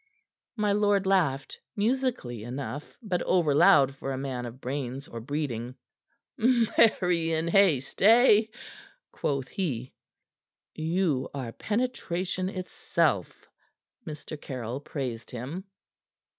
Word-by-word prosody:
My 210 -2 +1
lord 205 -1 +2
laughed, 160 -9 +1 0.2
musically 225 - -1
enough, 135 +4 -6
but 185 -5 -1
overloud 145 -5 +4
for 135 0 -5
a 130 - -2
man 130 -2 -4
of 120 +2 -10
brains 135 0 -4
or 115 - -7
breeding. 125 -3 -3 0.6
"Marry 215 -8 +3
in 160 +1 0
haste, 170 -8 +3
eh?" 220 0 +7 0.7
quoth 135 -3 -2
he. 130 - -3 0.8
"You 160 -4 0
are 130 -4 -4
penetration 190 - -2
itself," 185 -2 -1 0.6
Mr. 155 -2 -8
Caryll 125 -1 -5
praised 130 -5 -5
him. 135 - -6
155 Hz, 105 wpm, -28 LUFS, 130-195 Hz, 0.8 s, eh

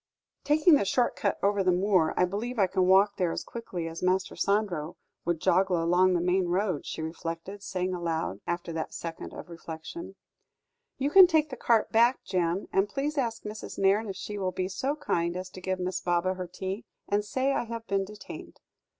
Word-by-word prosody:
"Taking 310 +4 +5
the 285 - +5
short 240 +5 +1
cut 200 - 0
over 200 0 +2
the 185 - +3
moor, 180 -3 +2
I 180 - +5
believe 220 +7 -4
I 200 - +5
can 185 0 +1
walk 195 +2 +5
there 180 -3 +1
as - - -3
quickly 185 -8 -5
as 165 +1 -7
Master 185 +1 +1
Sandro 190 -6 0 0.3
would 170 -1 0
joggle 185 +1 +3
along 180 +3 +3
the 170 - +1
main 180 +1 +2
road," 180 -3 -1
she 160 - -4
reflected, 165 +4 -5
saying 185 -1 -2
aloud 165 - -2
after 175 -1 -3
that 160 0 -4
second 165 -1 -6
of - - -9
reflection: 170 - -8 0.8
"You 275 +2 0
can 380 +1 +10
take 310 -3 +2
the - - -4
cart 230 -2 +2
back, 235 +3 +4
Jem; 180 0 -1
and 195 +1 +2
please 290 +2 -2
ask 235 -5 -1
Mrs. 210 0 -7
Nairne 200 +3 +2
if 195 - -4
she 205 +2 -5
will 185 -1 -1
be 185 0 -2
so 260 +10 -1
very 300 - -19
kind 170 +1 0
as 185 0 -6
to 185 - -10
give 185 0 -2
Miss 180 0 -2
Baba 175 +1 +1
her 185 -1 -5
tea; 190 +5 -5 0.2
and 205 +1 +1
say 260 +6 0
I - - -1
have 230 0 -6
been 195 -2 0
detained." 210 +2 -10
190 Hz, 205 wpm, -28 LUFS, 175-215 Hz, 0.8 s, can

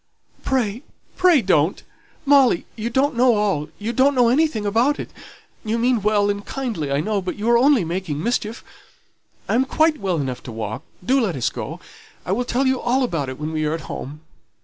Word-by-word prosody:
"Pray, 240 -3 -1 0.3
pray 355 -8 +4
don't. 175 -2 +2 0.4
Molly 275 -9 +4
you 230 +1 -3
don't 265 +3 +1
know 245 0 +4
all 195 -8 0
you 220 +3 -4
don't 270 +3 +3
know 245 -2 +4
anything 265 -5 +1
about 235 +8 +2
it; - - -6 0.5
you 220 +1 -1
mean 240 -1 +1
well 205 0 +2
and 200 0 -5
kindly, 220 - -4
I 140 +1 +1
know, 205 +3 -1
but 185 -1 -4
you 215 +2 -4
are 235 - +6
only 265 - +4
making 165 -3 -3
mischief. 230 -1 -2 0.8
I - - 0
am 250 +3 +3
quite 310 +3 +2
well 190 -4 -1
enough 130 -4 -3
to - - -6
walk, 110 -1 -5 0.2
do 265 +4 +3
let 195 -8 -1
us 125 - -1
go; - - -6 0.5
I 180 - -3
will 245 +6 0
tell 250 +2 0
you 260 -1 +1
all 255 +2 +1
about 165 - -2
it 130 - -8
when 155 +1 -4
we 155 -1 -2
are 150 +1 0
at 165 - -6
home." 150 +1 -7
215 Hz, 205 wpm, -21 LUFS, 170-255 Hz, 0.8 s, are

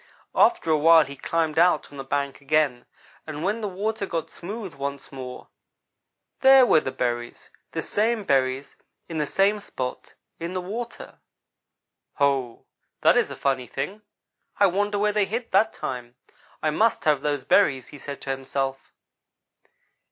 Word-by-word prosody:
"After 350 - +3
a 155 - +4
while 165 0 +7
he 140 +1 -9
climbed 160 +2 0
out 175 -4 +3
on 140 - -10
the - - -4
bank 140 0 -2
again, 140 -4 +1 0.4
and 155 0 -5
when 210 +5 0
the 210 - -2
water 200 +2 -2
got 165 -3 -3
smooth 195 0 -7
once 140 0 -5
more 130 -2 -8 0.9
there 265 -1 +8
were 160 - +5
the 130 - -4
berries 120 -1 -3 0.2
the - - -2
same 220 +1 0
berries, 135 -3 0 0.3
in 165 -2 -4
the 150 - 0
same 200 +5 +2
spot 130 -10 -6 0.2
in 170 +2 -4
the 185 - -1
water. 225 +6 -7 1.0
"'Ho! 135 -4 0 0.4
that - - +5
is - - +2
a - - -6
funny 130 -3 -1
thing. 190 - -5 0.6
I 200 - +5
wonder 205 +2 +1
where 210 +1 +1
they 210 -1 +2
hid 230 +4 -4
that 220 0 +4
time. 125 -2 -6 0.5
I 155 - +2
must 215 +3 +1
have 150 -3 +3
those 145 -2 -1
berries!' 130 -1 +3
he 145 - -11
said 140 0 -7
to 135 - -3
himself. 135 0 -3
155 Hz, 160 wpm, -25 LUFS, 135-200 Hz, 1.0 s, there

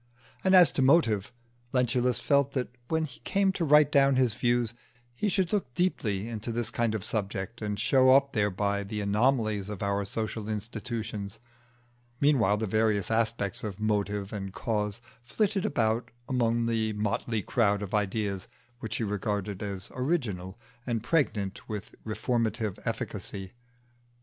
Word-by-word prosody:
And 190 0 +5
as 180 -2 +8
to - - 0
motive, 120 - +3 0.4
Lentulus 125 -1 +2
felt 140 -1 +2
that 125 -2 -2
when 160 +2 +1
he 130 -5 -11
came 195 0 +1
to 190 - -2
write 150 -1 +6
down 140 -1 +5
his 130 -4 +3
views 120 -1 +1 0.4
he 205 - -1
should 190 0 0
look 190 -12 0
deeply 110 - 0
into 115 0 -4
this 120 0 -1
kind 115 -2 0
of 105 - -3
subject 105 +1 -3
and 105 -2 -2
show 130 +2 +4
up 140 +1 +5
thereby 100 -1 0
the 105 +2 -4
anomalies 105 -1 +1
of 105 -2 -5
our 100 0 0
social 110 +1 -3
institutions; 110 -1 -4 0.8
meanwhile 125 -9 +3
the 110 - -1
various 110 0 +1
aspects 110 -3 0
of 105 -2 -5
"motive" 105 -1 -1
and 95 -2 -5
"cause" 105 -1 -2 0.2
flitted 195 - 0
about 110 +1 0 0.2
among 120 -2 +1
the 110 -2 0
motley 105 +1 -1
crowd 105 -2 +1
of 100 - -7
ideas 100 -1 -1 0.3
which 110 -3 -4
he - - -1
regarded 105 -1 -2
as 100 -2 -5
original, 120 - -2 0.3
and 115 -3 -2
pregnant 115 - 0
with 105 -3 -5
reformative 110 -1 -1
efficacy. 100 -4 -4
110 Hz, 150 wpm, -28 LUFS, 105-125 Hz, 0.8 s, as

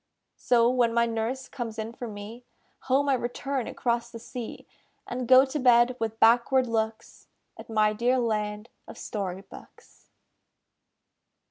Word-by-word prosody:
So, 235 -1 +3
when 240 -2 +2
my 235 0 +4
nurse 230 +3 -3
comes 235 -4 -6
in 220 +1 -5
for 240 0 -7
me, 215 +3 -9 0.5
Home 275 +2 +3
I 275 - +3
return 255 +1 -3
across 235 -1 -2
the 235 - -9
sea, 235 0 -8 0.4
And 250 0 -4
go 260 +2 +7
to 275 +3 -4
bed 245 -1 +4
with 225 0 -3
backward 245 +3 +4
looks 220 -1 -4 0.3
At - - -12
my 215 -1 +2
dear 240 +4 +1
land 210 -2 -2 0.2
of - - -11
Story 190 -3 -5
books. 195 - -17
235 Hz, 145 wpm, -27 LUFS, 220-250 Hz, 0.5 s, go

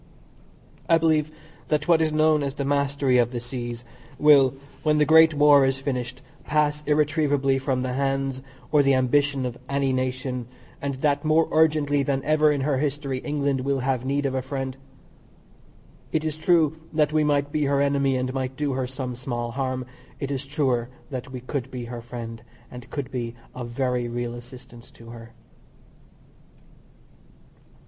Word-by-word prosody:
I 165 - +6
believe 155 -2 +2 0.4
that 150 -1 0
what 165 -2 +5
is 160 -1 +1
known 155 0 +3
as 140 -1 -3
the 140 - -3
"mastery 140 -2 +2
of 120 -1 +3
the 120 - -3
seas" 120 -1 -6 0.3
will, 145 -3 +6 0.3
when 150 0 +2
the 150 - +4
great 160 0 +6
war 145 -1 +6
is 135 0 +1
finished, 130 -1 -4 0.2
pass 150 0 0
irretrievably 145 -3 +2
from 130 -1 -1
the 130 -1 -2
hands 135 0 -1 0.3
or 150 -1 +5
the 140 -1 +3
ambition 135 +1 +1
of 125 -1 -5
any 140 -1 +1
nation, 130 -1 -2 0.3
and 140 -1 -2
that 145 -1 +2
more 155 +1 +3
urgently 150 -2 +3
than 135 -1 -1
ever 155 0 +3
in 145 -2 -1
her 135 -1 0
history 140 -2 -2
England 140 -2 -1
will 135 0 -1
have 130 -1 -1
need 140 +2 -1
of 135 - 0
a 130 - -1
friend. 130 0 -4 1.4
It 155 - 0
is 155 -1 -2
true 160 -1 +2
that 155 -1 +1
we 155 -1 +3
might 145 -1 +1
be 150 -1 0
her 140 0 +1
enemy 140 -1 +2
and 130 0 -2
might 130 0 -3
do 145 -2 -1
her 130 -1 -2
some 130 -1 -5
small 120 -1 -4
harm 130 0 -2 0.3
it 140 -1 -3
is 140 0 -4
truer 130 -5 0 0.2
that 130 0 -5
we 130 -1 -6
could 130 0 -4
be 125 -2 -6
her 120 0 -7
friend, 115 -1 -7 0.3
and 125 -1 -10
could 140 -4 -5
be 120 -2 -4 0.2
of 125 -1 -6
very 125 -1 -1
real 120 0 -3
assistance 120 0 -12
to 115 0 -14
her. 115 -1 -11
135 Hz, 170 wpm, -24 LUFS, 125-150 Hz, 1.4 s, I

